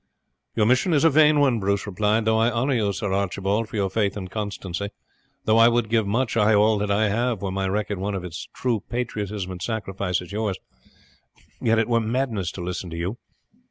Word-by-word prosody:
"Your 105 Hz, -, +3 dB
mission 130 Hz, -, +3 dB
is 145 Hz, -, +3 dB
a 165 Hz, -, +6 dB
vain 150 Hz, 0 st, +5 dB
one," 130 Hz, -5 st, +3 dB
Bruce 100 Hz, 0 st, 0 dB
replied. 105 Hz, +2 st, +1 dB
"Though 110 Hz, 0 st, +3 dB
I 115 Hz, +1 st, +4 dB
honour 125 Hz, +4 st, 0 dB
you, 105 Hz, -5 st, +1 dB
Sir 100 Hz, -1 st, -3 dB
Archibald, 100 Hz, +3 st, -1 dB
for -, -, -8 dB
your 100 Hz, -2 st, 0 dB
faith 100 Hz, -1 st, 0 dB
and 95 Hz, -2 st, -6 dB
constancy; 100 Hz, -2 st, -4 dB, 0.6 s
though 110 Hz, +1 st, +4 dB
I 115 Hz, -, +8 dB
would 120 Hz, -2 st, +1 dB
give 110 Hz, -3 st, +2 dB
much, 120 Hz, +4 st, 0 dB
ay 110 Hz, -1 st, +4 dB
all 105 Hz, +1 st, +4 dB
that 105 Hz, 0 st, -1 dB
I 105 Hz, +1 st, +2 dB
have, 115 Hz, -1 st, -1 dB
were 95 Hz, -, -2 dB
my 95 Hz, 0 st, -1 dB
record 105 Hz, 0 st, -2 dB
one 100 Hz, +1 st, -2 dB
of 90 Hz, -2 st, -4 dB
as 90 Hz, 0 st, -7 dB
true 120 Hz, -4 st, 0 dB
patriotism 105 Hz, -5 st, -3 dB
and 90 Hz, -1 st, -7 dB
sacrifice 100 Hz, -4 st, -2 dB
as 90 Hz, +1 st, -10 dB
yours, 105 Hz, -2 st, -2 dB, 1.0 s
yet 115 Hz, 0 st, +3 dB
it 115 Hz, -, +2 dB
were 115 Hz, -1 st, +2 dB
madness 110 Hz, -6 st, -1 dB
to 95 Hz, -, -6 dB
listen 90 Hz, 0 st, -4 dB
to 85 Hz, -, -6 dB
you. 90 Hz, +7 st, -3 dB
105 Hz, 215 wpm, -24 LUFS, 95-115 Hz, 1.0 s, I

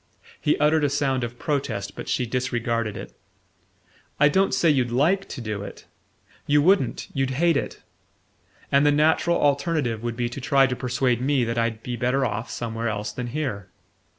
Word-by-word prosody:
He 150 Hz, -, +2 dB
uttered 150 Hz, +1 st, +3 dB
a 145 Hz, -, +3 dB
sound 135 Hz, -2 st, 0 dB
of 120 Hz, 0 st, -5 dB
protest, 135 Hz, -10 st, -3 dB
but -, -, -7 dB
she 125 Hz, -, 0 dB
disregarded 115 Hz, -3 st, -2 dB
it. -, -, -9 dB, 1.0 s
"I 150 Hz, 0 st, +6 dB
don't 190 Hz, +6 st, +2 dB
say 170 Hz, -, +2 dB
you'd 130 Hz, -4 st, +1 dB
LIKE 165 Hz, +11 st, +1 dB
to 130 Hz, -, -6 dB
do 110 Hz, -3 st, -4 dB
it. 100 Hz, -, -9 dB, 0.6 s
You 145 Hz, 0 st, +4 dB
wouldn't: 165 Hz, -, +2 dB
you'd 135 Hz, -1 st, 0 dB
hate 165 Hz, +5 st, +2 dB
it. -, -, -3 dB, 0.9 s
And 140 Hz, +1 st, +4 dB
the 145 Hz, -, +5 dB
natural 160 Hz, +3 st, +2 dB
alternative 140 Hz, -5 st, 0 dB
would 120 Hz, -1 st, -4 dB
be 120 Hz, -1 st, 0 dB
to 125 Hz, +3 st, -7 dB
try 135 Hz, 0 st, +4 dB
to 130 Hz, -1 st, -1 dB
persuade 125 Hz, -1 st, 0 dB
me 135 Hz, -1 st, +2 dB
that 115 Hz, 0 st, -1 dB
I'd 115 Hz, -1 st, -1 dB
be 125 Hz, -, -4 dB
better 130 Hz, +2 st, +1 dB
off 110 Hz, 0 st, -3 dB
somewhere 115 Hz, 0 st, -4 dB
else 105 Hz, 0 st, -3 dB
than 125 Hz, -1 st, -5 dB
here. 120 Hz, -8 st, -4 dB
130 Hz, 180 wpm, -24 LUFS, 115-145 Hz, 1.0 s, I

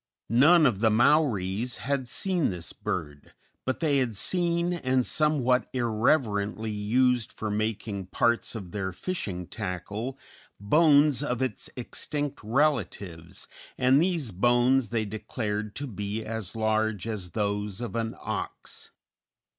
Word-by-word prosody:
None 155 Hz, +7 st, +6 dB
of 120 Hz, -8 st, +2 dB
the 110 Hz, 0 st, +4 dB
Maoris 120 Hz, -3 st, +2 dB
had 140 Hz, -2 st, -2 dB
seen 180 Hz, +3 st, +1 dB
this 90 Hz, -4 st, -5 dB
bird, 75 Hz, -1 st, -5 dB, 0.3 s
but 130 Hz, +4 st, -2 dB
they 145 Hz, -4 st, +3 dB
had 120 Hz, -4 st, -1 dB
seen 170 Hz, -, +1 dB
and 130 Hz, -6 st, +1 dB
somewhat 140 Hz, -5 st, +2 dB
irreverently 110 Hz, -3 st, +1 dB
used 120 Hz, +3 st, +1 dB
for 110 Hz, -1 st, -4 dB
making 105 Hz, -2 st, -2 dB
parts 120 Hz, +5 st, +1 dB
of 95 Hz, -6 st, -7 dB
their 95 Hz, -1 st, -3 dB
fishing 95 Hz, -, -4 dB
tackle, 100 Hz, +9 st, -5 dB, 0.4 s
bones 145 Hz, -, +4 dB
of 125 Hz, -5 st, -1 dB
its 130 Hz, -6 st, -2 dB
extinct 145 Hz, +3 st, -3 dB
relatives, 105 Hz, -, -1 dB, 0.3 s
and 130 Hz, +3 st, +4 dB
these 170 Hz, -, 0 dB
bones 120 Hz, +4 st, +3 dB
they 110 Hz, -1 st, 0 dB
declared 105 Hz, 0 st, -4 dB
to 145 Hz, -, -3 dB
be 105 Hz, -2 st, -4 dB
as 110 Hz, -3 st, -4 dB
large 110 Hz, -2 st, 0 dB
as 95 Hz, -6 st, -5 dB
those 105 Hz, -1 st, -2 dB
of 120 Hz, -1 st, -5 dB
an 115 Hz, -1 st, -2 dB
ox. -, -, -6 dB
115 Hz, 130 wpm, -27 LUFS, 105-135 Hz, 0.4 s, None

